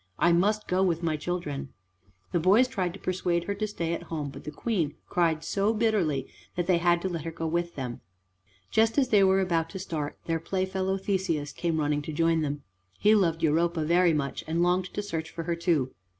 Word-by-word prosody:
I 170 - +4
must 205 +5 +2
go 185 +1 +1
with 175 -3 +1
my 160 -2 +1
children." 150 -4 -4 0.6
The 175 - +2
boys 200 +9 +5
tried 185 -7 -2
to - - -10
persuade 180 -2 0
her 200 - -2
to 215 +2 -2
stay 170 -5 -2
at - - -3
home, 150 -3 -3
but - - -11
the - - -3
Queen 165 -5 -1
cried 165 -3 +1
so 205 +3 +1
bitterly 195 - +1 0.3
that 175 - 0
they 175 -1 +3
had 175 0 +2
to - - +1
let 170 -4 -4
her 165 - -3
go 165 0 -5
with 170 +1 -1
them. 125 -3 -5 0.7
Just 225 +3 +3
as 265 -3 +3
they 205 -4 +5
were 190 0 +4
about 165 -3 0
to 195 - -7
start, 155 -6 -4
their 165 -1 0
playfellow 190 +2 -1
Theseus 185 -7 -1
came 165 -2 -1
running 150 0 +1
to 150 - -6
join 165 +1 +2
them. 145 -1 -3 0.3
He 210 - +5
loved 165 -6 +2
Europa 165 +1 +2
very 175 +2 +4
much, 140 -3 -2
and 165 +2 +1
longed 180 +1 +2
to 205 - -2
search 165 -5 -4
for 165 - -6
her 170 +1 -1
too. 165 -7 0
170 Hz, 215 wpm, -28 LUFS, 160-190 Hz, 0.7 s, boys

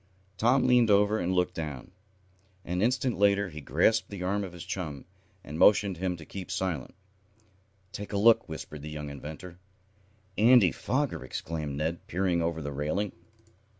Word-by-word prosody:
Tom 125 +5 +3
leaned 125 -3 +4
over 105 +1 +4
and 90 - -1
looked 90 0 +1
down. 75 -1 -6 0.7
An 90 +1 -2
instant 125 0 +1
later 100 -1 +3
he 75 -2 -8
grasped 85 - +2
the 100 -3 -6
arm 100 +2 0
of 95 - -6
his 85 -1 -9
chum, 80 -7 -5 0.4
and 75 +2 -7
motioned 100 -2 +5
to - - -12
him 90 -2 -1
to 80 - -11
keep 95 +1 -8
silent. 85 -9 -3 1.0
"Take 105 0 -7
a 100 - -1
look," 115 +3 +5
whispered 75 -1 -7
the 75 - -7
young 75 -1 -6
inventor. 80 +5 -9 0.8
"Andy 115 -5 +6
Foger!" - - -2
exclaimed 75 +2 -5
Ned, 80 +3 -3
peering 90 -1 0
over 85 -1 -2
the 75 - -4
railing. 75 +9 -2
90 Hz, 165 wpm, -28 LUFS, 75-100 Hz, 1.0 s, Andy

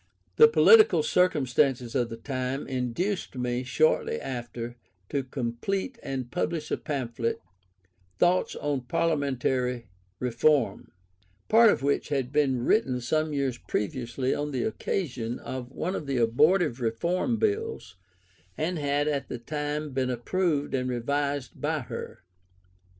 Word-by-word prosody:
The 455 - +10
political 455 0 +6
circumstances 135 - +2
of 120 -3 0
the 115 - -6
time 130 +2 -3
induced 135 - -2
me, 125 0 -1
shortly 130 - +2
after, 120 -2 -5 0.3
to 140 - 0
complete 135 - -3
and 130 -2 -4
publish 155 -1 -2
a - - +1
pamphlet 120 -5 -3 0.8
(Thoughts 180 +1 +2
on 145 -2 -2
Parliamentary 130 - 0 0.3
Reform), 125 -2 +1 0.6
part 225 +1 +7
of 170 - +1
which 140 +1 0
had 135 -3 -1
been 135 -5 +1
written 130 - +2
some 155 +5 0
years 135 -4 -1
previously 120 +5 -2
on 145 0 -2
the 130 -4 -2
occasion 125 - -2
of 125 -1 -6
one 180 +7 -3
of 150 - -5
the 135 -2 0
abortive 130 +4 +3
Reform 170 - 0
Bills, 440 - -2 0.6
and 165 +2 -1
had 145 0 0
at 140 -3 -1
the - - -4
time 150 +3 -3
been 130 -1 -1
approved 145 +4 -1
and 130 -1 0
revised 140 +2 -2
by - - 0
her. - - -7
135 Hz, 130 wpm, -27 LUFS, 125-155 Hz, 0.8 s, The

